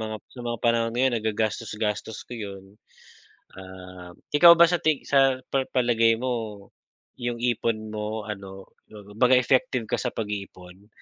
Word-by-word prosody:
mga 110 0 -4 0.2
sa 125 - -10
mga 120 -1 -3
panahon 115 -1 +1
ngayon 130 0 +2
nagagastos-gastos 110 0 -3
ko - - -9
yun, 100 -3 -7 0.9
ah, 90 -1 -11 0.2
ikaw 170 +3 +9
ba 170 - +8
sa 175 0 +1
ti 155 -3 +1
sa 135 -2 +3
pa 135 -1 +1
palagay 115 -2 +3
mo, 110 -5 -4 0.5
yung 120 -1 -3
ipon 115 -2 -1
mo 105 0 -4
ano, 95 -2 -8 0.2
kumbaga 110 +5 +2
effective 130 -1 +1
ka - - 0
sa 125 - -2
pag-iipon? 100 -2 -7
110 Hz, 140 wpm, -25 LUFS, 105-125 Hz, 0.9 s, ikaw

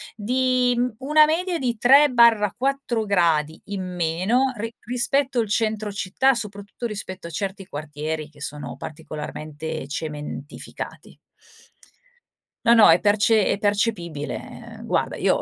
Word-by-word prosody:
di, 250 +3 +1
mhmm, 245 -2 0
una 300 +3 +5
media 345 +3 0
di 240 -3 -1
3/4 245 -1 +4
gradi 165 -5 +1
in 200 -2 -4
meno 185 +11 +1
ri 225 +2 -5
rispetto 255 +2 0
al 225 - 0
centro 215 0 0
città, 200 +8 +2
soprattutto 210 -1 -6
rispetto 190 -4 -7
a - - -8
certi 195 +3 -4
quartieri 155 0 -5
che 150 -2 -19
sono 140 -4 -6
particolarmente 155 0 -7
cementificati. 150 -1 -7 1.5
No, 235 - +7
no, 225 - +8
è 165 +2 +5
perce 210 +1 +3
è - - +1
percepibile 200 -7 -3
guarda, - - -1
io - - +1
205 Hz, 120 wpm, -23 LUFS, 160-245 Hz, 1.5 s, no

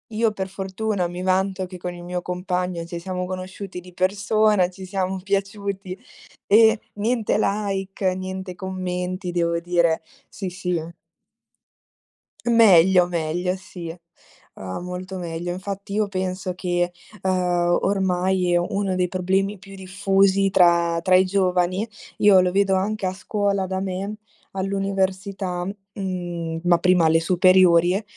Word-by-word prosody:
Io, 225 +1 +2
per 190 -2 -4
fortuna, 195 0 -2
mi 175 +1 -6
vanto 190 0 0
che 180 0 -9
con 180 0 -5
il 175 0 -10
mio 180 0 -3
compagno 180 -1 -2
ci 170 0 -6
siamo 180 +1 -4
conosciuti 185 +1 -6
di 180 0 -14
persona, 200 +1 +2
ci 190 +1 -10
siam 190 0 -2
piaciuti. 195 -1 -3 0.5
E 220 +1 +5
niente 220 +2 0
like, 195 -2 -1
niente 185 0 -5
commenti, 185 -1 -4
devo 170 -1 0
dire. 170 -2 +2 0.3
Sì, 190 -3 -5
sì. 180 -2 -2 1.6
Meglio, 190 -6 +6
meglio, 175 +2 -1
sì. 175 -3 -8 0.6
Ah, 95 -1 -6
molto 180 +1 -6
meglio. 170 0 -4
Infatti, 200 +2 -6
io 210 0 +1
penso 185 -1 -3
che, 175 -1 -1 0.3
ehm, 180 -2 +1
ormai 190 -2 +1
è - - +5
uno 195 +1 -1
dei 180 0 +1
problemi 190 +2 0
più 195 +1 -12
diffusi 195 +1 +2
tra 170 -2 +4
tra 185 - +2
i 185 - +6
giovani, 185 +1 +1 0.3
io 205 -2 +6
lo 180 0 +1
vedo 195 +1 +2
anche 200 +2 -1
a 185 - -1
scuola 200 0 -1
da 190 0 -2
me, 195 +2 -3 0.4
all'università, 190 -1 -2 0.3
mhmm, 175 -4 -4
ma 175 -1 +4
prima 180 -2 +4
alle 160 +1 +4
superiori, 180 +1 +4
185 Hz, 135 wpm, -23 LUFS, 180-195 Hz, 1.6 s, Meglio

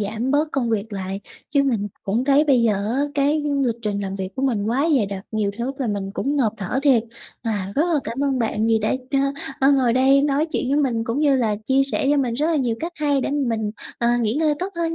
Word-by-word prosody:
giảm 220 +5 -2
bớt 295 +2 +2
công 245 -4 0
việc 220 0 -2
lại, 195 0 -4 0.3
chứ 280 -2 +3
mình 225 -7 0
cũng 225 +6 -1
thấy 280 +2 +4
bây 265 -6 +3
giờ 225 -2 +3 0.2
á 270 - +1
cái 290 +2 +2 0.2
lịch 235 -3 +1
trình 205 -2 -2
làm 195 -1 -4
việc 190 -1 -4
của 260 - -2
mình 235 -7 +1
quá 265 +8 +1
dày 215 - +2
đặc, 195 0 -6
nhiều 215 -2 0
thứ 255 +3 -2
là 260 - -1
mình 200 -2 -3
cũng 285 +2 -1
ngộp 230 -6 +2
thở 210 +5 -2
thiệt. 265 -6 +4 0.4
À, 200 -4 -2
rất 295 - +4
là 300 - +3
cảm 270 +4 -2
ơn 270 -2 0
bạn 220 -2 0
vì 225 -1 +3
đã 215 0 0 0.2
ch - - -4 0.5
ơ, 275 +2 +5
ngồi 255 -4 +3
đây 270 +2 +4
nói 290 +2 +1
chuyện 255 - -1
với 280 - +2
mình 230 -4 0
cũng 230 +4 -2
như 285 -3 +4
là 220 -4 +1
chia 265 +3 +3
sẻ - - 0
cho 290 - +3
mình 250 -4 0
rất 300 +5 0
là 330 - +1
nhiều 245 -5 0
cách 335 +2 -4
hay 290 -3 +1
để - - -2
mà 290 - -1 0.2
mình, 215 -1 -2 0.3
ờ, 235 - +1
nghỉ 225 0 0
ngơi 305 0 +2
tốt 370 - -2
hơn 330 -1 -1
250 Hz, 265 wpm, -22 LUFS, 215-280 Hz, 0.5 s, ơ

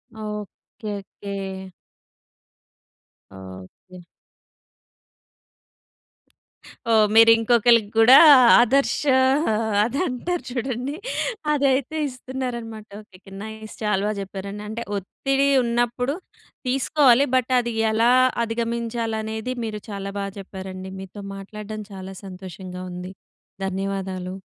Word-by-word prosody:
Okay. 210 0 -7
Okay. 195 -1 -7 1.6
Okay. 95 - -12 2.9
ఓహ్! 215 -2 +5
మీరు 225 0 +8
ఇంకొకళ్ళకి 230 -1 +4
కూడా 250 +4 +9 0.4
ఆదర్శ 270 +4 +3 0.8
అది 250 +5 -2
అంటారు 335 +8 -3
చూడండి. 255 +3 -3 0.6
అదైతే 280 +1 +1
ఇస్తున్నారనమాట. 245 -4 -6
ఓకె. 190 -3 -18
ఓకె. 195 - -16
నైస్ 220 0 -9
చాలా 210 -2 +1
బా - - 0
చెప్పారండి. 195 +1 -7
అంటే 230 +2 -4
ఒత్తిడి 270 +8 -1 0.2
ఉన్నప్పుడు 240 +3 0 0.5
తీసుకోవాలి. 270 0 +4
బట్ 255 0 +1
అది 235 -1 -3 0.2
ఎలా 230 +3 +3 0.3
అధిగమించాలి 230 0 -2
అనేది, 220 +3 -4
మీరు 210 -2 -5
చాలా 200 -1 -5
బా 200 - -2
చెప్పారండి. 190 -1 -8
మీతో 195 +2 -9
మాట్లాడడం 210 +2 -7
చాలా 190 0 -8
సంతోషంగా 185 -1 -8
ఉంది. 180 +1 -7 0.5
ధన్యవాదాలు. 190 -1 -4
220 Hz, 95 wpm, -23 LUFS, 195-240 Hz, 2.9 s, కూడా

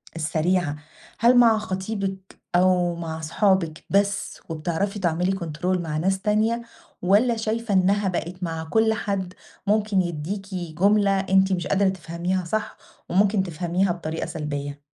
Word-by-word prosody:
السريعة 165 0 0 0.4
هل 240 +2 +5
مع 230 -2 +6
خطيبِك 190 -1 -4
أو 180 -1 +3
مع 160 -1 -5
صحابِك 165 -1 +1
بس 200 +1 0
وبتعرفي 170 +6 -2
تعملي 175 0 +1
كنترول 180 0 -2
مع 155 -3 -3
ناس 190 +4 0
تانية، 215 +3 +1 0.4
والّا 215 +6 +3
شايفة 225 0 -2
إنها 195 +2 +3
بقِت 180 0 -3
مع 165 -2 -3
كُلّ 220 +7 +2
حد 195 -4 -3 0.3
ممكن 210 -2 +2
يديكِ 185 +4 -4
جملة 195 +4 +2
أنتِ 190 0 +3
مش 175 -2 -2
قادرة 200 0 +3
تفهميها 180 0 -3
صح 215 +6 -3 0.3
وممكن 195 +2 +3
تفهميها 175 +2 0
بطريقة 165 -2 -4
سلبية؟ 145 -3 -5
185 Hz, 130 wpm, -24 LUFS, 170-200 Hz, 0.4 s, مع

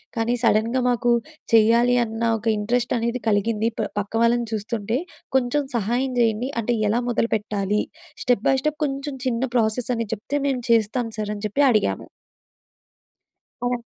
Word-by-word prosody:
కానీ 230 +1 0
సడెన్‌గా 230 +3 +2
మాకు 240 0 +1 0.4
చేయాలి 235 +3 +5
అన్న 225 0 -4
ఒక 220 - -13
ఇంట్రెస్ట్ 240 +4 0
అనేది 235 +1 -2
కలిగింది 215 +2 +1
ప - - -1
పక్క 205 +2 -5
వాళ్ళని 235 0 +2
చూస్తుంటే 220 +1 -2 0.4
కొంచెం 265 +3 +2
సహాయం 240 +5 0
చేయండి 230 +2 +1
అంటే 235 +2 0
ఎలా 235 +3 +1
మొదలుపెట్టాలి 210 -3 0 0.4
స్టెప్ 245 -4 +1
బై 270 - +4
స్టెప్ 305 0 -1
కొంచెం 275 0 -4
చిన్న 245 0 0
ప్రాసెస్ 230 +2 +1
అని 230 -2 -2
చెప్తే 225 +7 -4
మేము 260 -3 0
చేస్తాం 230 +1 +2
సార్ 210 - -2
అని 205 - -9
చెప్పి 275 +8 0
అడిగాము. 205 - +1 1.6
అ! 245 -1 -1
230 Hz, 145 wpm, -23 LUFS, 215-245 Hz, 1.6 s, చేయాలి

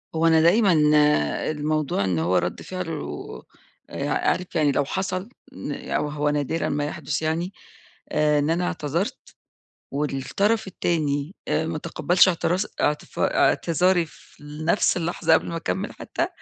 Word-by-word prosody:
هو 165 +1 +3
أنا 160 -1 +5
دايمًا 190 +4 +5 0.8
الموضوع 150 -6 -1
إن 90 -4 0
هو 85 +3 +2
رَدّ 90 - -2
فعله 160 - -6 0.5
آآعارف 180 -1 -1
يعني 150 -3 +3
لو 140 0 +1
حصل 190 - -3 0.5
أو 150 - -2
هو 150 0 0
نادرًا 145 +2 -1
ما 145 0 -1
يحدث 150 -1 -3
يعني، 165 +4 -1 0.6
آآ 150 -1 +3
إن 145 +2 0
أنا 175 +2 +1
اعتذرت، 170 +2 -3 0.6
والطرف 150 - 0
التاني 155 -3 -1
آآ 160 +1 0
ما 165 - -2
تقبلش 175 +3 +3
اعتراز 180 +2 +1
اعت 150 0 +1 0.2
اعتذاري 175 +1 +2
في 145 - -19
نفس 155 +6 +1
اللحظة 170 0 +1
قبل - - +3
ما 170 - -4
أكمل 190 +4 -3
حتى، - - -3
160 Hz, 135 wpm, -24 LUFS, 145-180 Hz, 0.8 s, أنا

